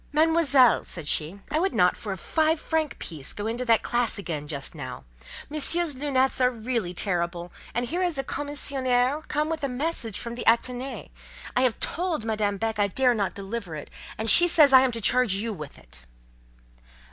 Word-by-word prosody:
"Mademoiselle," 300 -5 +4
said 165 -4 -8
she, 160 +8 -1
"I 310 - +1
would 380 +3 0
not 180 0 +4
for 210 - -6
a 190 - -4
five 315 - +1
franc 315 -2 -2
piece 155 -5 -6
go 205 - -5
into 235 +3 -2
that 230 -2 +3
classe 240 -2 +1
again 155 -7 -5
just 140 -2 -5
now: 130 -5 -8 0.4
Monsieur's 310 +2 +2
lunettes 265 -1 0
are 250 - +5
really 230 -5 -3
terrible; 175 -2 -2 0.2
and 240 +1 0
here 345 +8 -3
is 350 -5 0
a 270 - -1
commissionaire 270 -1 -1
come 300 +1 -1
with 320 -2 -4
a 280 - 0
message 250 - -3
from 235 -1 -5
the 240 - -5
Athénée. 250 +3 0 0.4
I 250 - +3
have 255 -3 +2
told 335 -9 -1
Madame 210 -2 -1
Beck 220 0 -2
I 205 - +3
dare 250 +5 +2
not 205 -4 -2
deliver 200 -3 -6
it, 150 - -9 0.3
and 220 - -3
she 350 +10 +7
says 300 -5 +5
I 260 - +9
am 260 -1 +2
to 230 - -4
charge 245 -2 +3
you 220 +3 -2
with 150 -6 -9
it." - - -14
245 Hz, 195 wpm, -25 LUFS, 200-285 Hz, 0.4 s, I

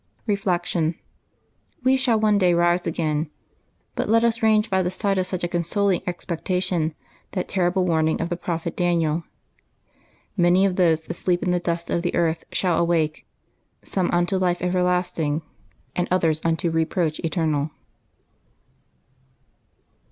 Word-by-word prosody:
Reflection. 175 -5 0 0.4
— - - -41
We 260 +1 +4
shall 245 -4 +2
one 210 -1 +3
day 180 -2 +4
rise 175 +1 +2
again; 155 -1 -1 0.6
but - - -2
let 230 +1 +4
us 230 -1 +1
range 215 0 +4
by 190 -1 +1
the 180 - 0
side 195 +1 0
of 185 - 0
such 185 -1 -3
a - - +1
consoling 175 +2 0
expectation 175 -2 -1 0.4
that 185 - -2
terri 180 -2 +1
ble 185 0 +1
warning 160 -2 +1
of 165 - -2
the 175 - -1
prophet 170 -1 -4
Daniel, 170 -2 +1 1.1
"Many 180 0 +4
of 190 -2 +1
those 165 -3 +2
that - - -4
sleep 175 -1 0
in 180 - +1
the 180 - +2
dust 170 -1 -3
of 170 - +1
the 175 - -2
earth 165 -1 0
shall 180 -3 +1
awake, 165 -3 0 0.6
some 185 -3 -1
unto 175 +2 +1
life 180 -1 0
everlasting, 180 -4 0 0.5
and 180 - 0
others 165 -4 +1
unto 165 0 0
reproach 160 0 0
eternal.' 160 -3 0
175 Hz, 150 wpm, -23 LUFS, 165-185 Hz, 1.1 s, We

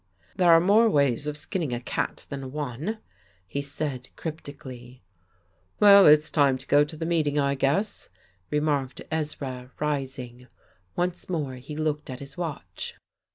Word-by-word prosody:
"There 180 -2 +5
are 165 - +8
more 210 +6 +5
ways 140 - +2
of 150 0 -3
skinning 145 -2 -2
a - - -3
cat 120 - -3
than 135 -2 -6
one," 150 - -3 0.5
he 140 +10 -3
said 140 -2 -4
cryptically. 130 - -8 0.8
"Well, 200 -1 +9
it's 150 +1 +6
time 140 -4 +3
to - - -10
go 145 +1 +5
to 150 +2 -7
the 160 - -3
meeting, 155 -4 +1
I 140 -1 +2
guess," 140 +10 0 0.4
remarked 145 -3 -1
Ezra, 140 -5 -3
rising. 130 -4 -3 0.5
Once 175 0 -2
more 150 -7 -2
he 135 +4 -8
looked 155 -1 -2
at 130 - -5
his 140 -1 -10
watch. 165 -5 -5
145 Hz, 150 wpm, -26 LUFS, 135-160 Hz, 0.8 s, Well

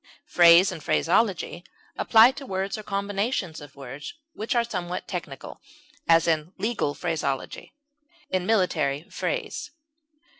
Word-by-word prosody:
Phrase 175 +2 +6
and 160 - -8
phraseology 175 -2 +1 0.3
apply 225 +2 +6
to 275 +1 -9
words 190 +1 -2
or 215 - -6
combinations 200 - -2
of 145 -2 -13
words 140 - -8 0.2
which 225 +4 -3
are 235 - +3
somewhat 180 -6 -5
technical; 150 -7 -7 0.5
as, 165 0 +5
in 160 +2 0
legal 210 -10 -1
phraseology; 150 - -4 0.5
in 185 -1 -2
military 160 -9 +1
phrase. - - -3
180 Hz, 120 wpm, -25 LUFS, 155-215 Hz, 0.5 s, Phrase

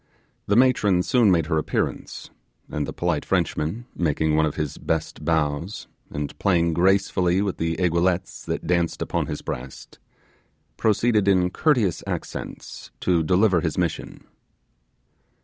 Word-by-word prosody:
The 100 - +2
matron 105 -7 +4
soon 120 -1 +3
made 85 -4 +3
her 80 0 +1
appearance; - - -3 0.4
and 75 -2 -2
the - - -4
polite 85 -4 -1
Frenchman, 85 +11 -1
making 80 -2 +1
one 80 0 +3
of 75 - -4
his 75 -3 -4
best 80 -1 -3
bows, 80 +3 -1 0.2
and 75 -1 -5
playing 85 -4 +2
gracefully 95 0 +2
with 100 -3 -2
the 80 0 -1
aiguillettes 90 +1 0
that - - -3
danced 85 -1 0
upon - - -2
his - - -5
breast, 65 +2 -7 0.8
proceeded 110 -1 +2
in 90 -2 +3
courteous 120 - +1
accents - - -6
to 90 -2 +2
deliver 90 +2 +3
his 80 -3 -2
mission. 85 -3 -3
90 Hz, 135 wpm, -24 LUFS, 80-95 Hz, 0.8 s, matron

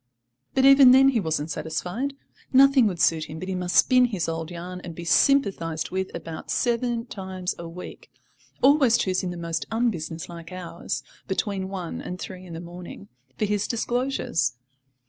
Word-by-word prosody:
But 265 0 +4
even 275 -2 +8
then 270 +1 +7
he 250 -4 +1
wasn't 160 -4 -2
satisfied. 180 - -3 0.4
Nothing 270 -2 +6
would 180 -4 -3
suit 160 -1 +3
him 155 +1 -8
but 185 +3 -6
he 190 - -2
must 180 -1 -2
spin 250 -1 +6
his 195 -9 -2
old 165 0 -3
yarn, 180 +1 -7
and 170 -2 -8
be 170 - -7
sympathised 165 - +2
with 190 0 -2
about 165 -1 -7
seven 235 -1 0
times 190 -5 -4
a 170 -1 -6
week, 180 +2 -10 0.5
always 265 -4 +5
choosing 185 -4 0
the 175 - -6
most 170 -1 -3
unbusinesslike 170 -6 -3
hours 170 -7 -5 0.2
(between 190 0 -2
one 185 -4 -5
and 180 - -6
three 185 0 -8
in 170 - -9
the 165 - -6
morning) 175 - -10 0.3
for 215 - +1
his 205 -1 0
disclosures. 240 - -1
185 Hz, 165 wpm, -25 LUFS, 170-235 Hz, 0.5 s, even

